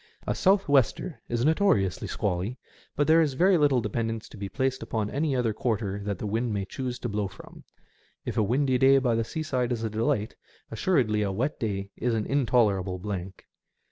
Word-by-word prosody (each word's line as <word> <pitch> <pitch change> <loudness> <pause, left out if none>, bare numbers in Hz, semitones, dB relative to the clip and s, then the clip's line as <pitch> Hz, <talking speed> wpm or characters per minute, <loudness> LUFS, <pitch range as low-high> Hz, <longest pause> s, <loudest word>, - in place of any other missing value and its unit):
A - - 0
south 195 +1 +3
wester 140 +1 +1
is 120 +1 0
notoriously 155 - +2
squally, 100 +5 -2 0.4
but 145 - +2
there 160 +2 +5
is 145 -4 0
very 185 +5 +4
little 145 -6 +3
dependence 115 0 -3
to - - -12
be 100 -1 -5
placed 130 +2 -1
upon 105 -2 -2
any 145 -1 0
other 120 -3 +1
quarter 105 -3 -2
that 100 -2 -2
the 105 - -5
wind 115 +3 -1
may 100 -2 -2
choose 125 +3 -4
to 120 - -4
blow 105 -2 -1
from. 95 +1 -14 0.6
If - - -3
a - - +2
windy 130 +4 +1
day 135 +1 +6
by 130 -3 +2
the 115 0 +1
seaside 130 -2 -2
is 115 -2 -2
a 110 - -2
delight, 110 -1 0 0.4
assuredly 115 - +1
a 100 -2 0
wet 125 +10 -2
day 100 -3 -3
is 120 -1 0
an 110 - -1
intolerable 110 -9 +1
blank. 95 -1 -6
115 Hz, 195 wpm, -27 LUFS, 105-135 Hz, 0.6 s, day